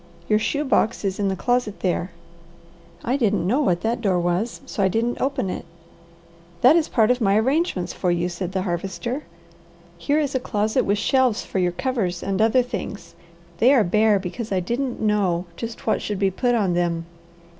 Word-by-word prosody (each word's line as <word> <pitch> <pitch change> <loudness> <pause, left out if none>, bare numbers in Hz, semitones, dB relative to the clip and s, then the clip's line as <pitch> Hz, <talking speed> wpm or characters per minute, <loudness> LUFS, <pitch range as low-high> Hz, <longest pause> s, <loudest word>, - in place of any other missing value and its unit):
"Your 215 - +3
shoe 290 +7 -1
box 230 -5 +1
is 195 0 -2
in 200 - +1
the 190 - 0
closet 245 +1 -1
there." 180 -1 0 0.9
"I 250 +4 0
didn't 205 -8 +1
know 250 +11 +2
what 175 -11 +1
that 235 +2 -1
door 190 -5 +2
was, 175 +7 -1
so - - -4
I 195 - +4
didn't 230 +5 -1
open 270 -7 0
it." 185 - -4 1.0
"That 260 +6 +7
is 330 -2 +2
a - - -19
part 225 0 +3
of 250 0 0
my 200 -2 +3
arrangements 255 - 0
for 180 - -1
you," 175 0 +1
said 180 +1 -4
the 190 -1 -1
Harvester. 190 - -3 0.7
"Here 290 +1 +1
is 285 -3 -1
a 260 - +1
closet 215 -3 0
with 200 +1 +1
shelves 255 0 +2
for 190 - -2
your 180 -1 +1
covers 195 -6 -2
and 195 +1 -1
other 225 +3 +4
things. 205 -7 -6 0.5
They 245 +4 +6
are 235 - +5
bare 215 +3 +3
because 200 +4 -5
I 190 - +2
didn't 240 +7 -2
know 195 -5 +1
just 230 +3 -7
what 220 - +1
should 210 - -3
be 195 0 +1
put 245 +5 +1
on 200 -6 +1
them. 170 -1 0
210 Hz, 200 wpm, -23 LUFS, 185-245 Hz, 1.0 s, That